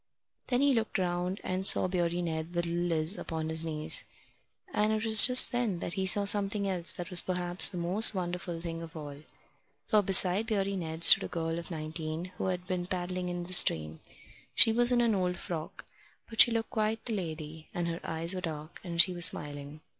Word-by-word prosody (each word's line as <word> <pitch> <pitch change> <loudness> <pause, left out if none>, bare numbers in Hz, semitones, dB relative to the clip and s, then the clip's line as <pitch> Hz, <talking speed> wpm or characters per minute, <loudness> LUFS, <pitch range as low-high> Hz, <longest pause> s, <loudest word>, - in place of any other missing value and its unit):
Then 250 0 -2
he 285 -1 +1
looked 225 -2 -3
round 180 +1 -4
and 185 +1 -5
saw - - +4
Beardy 175 -1 -3
Ned 160 +1 -6
with 175 0 -2
little 170 +1 -4
Liz 165 +3 -3
upon 160 -1 -6
his 160 0 -1
knees; 155 -1 0 0.7
and 210 +1 -1
it 220 +1 -3
was 220 0 +9
just 250 0 +5
then 240 -7 -3
that 170 - -7
he 190 -1 -3
saw 200 +2 +5
something 200 0 0
else 175 -6 -3
that 175 +2 -9
was 180 - +10
perhaps 180 0 +1
the 185 - -9
most 185 +6 +2
wonderful 175 -2 -6
thing 165 0 -8
of 165 0 -12
all. 145 -2 -10 0.7
For 215 - +2
beside 195 +2 +3
Beardy 200 -3 -3
Ned 165 -2 -7
stood - - +10
a - - -6
girl 165 0 -5
of 170 - -10
nineteen, 160 +1 -7
who - - -4
had 180 -1 -5
been 180 -2 -5
paddling 180 0 -5
in 175 0 -6
the 180 +1 -8
stream. 80 - +1 0.6
She 225 - +4
was 240 +2 +1
in 245 -1 +1
an 230 -2 0
old 180 -2 -3
frock, 165 -3 -9 0.4
but 225 -1 +3
she - - +7
looked 230 -1 -4
quite 220 0 -4
the 230 - -5
lady, 160 -4 -8
and 175 -1 -5
her 165 0 -6
eyes 165 +2 +4
were 185 - -6
dark, 155 -2 -9
and 170 -2 -8
she 185 +1 +2
was 175 -1 +4
smiling. 145 0 -7
180 Hz, 210 wpm, -28 LUFS, 165-200 Hz, 0.7 s, was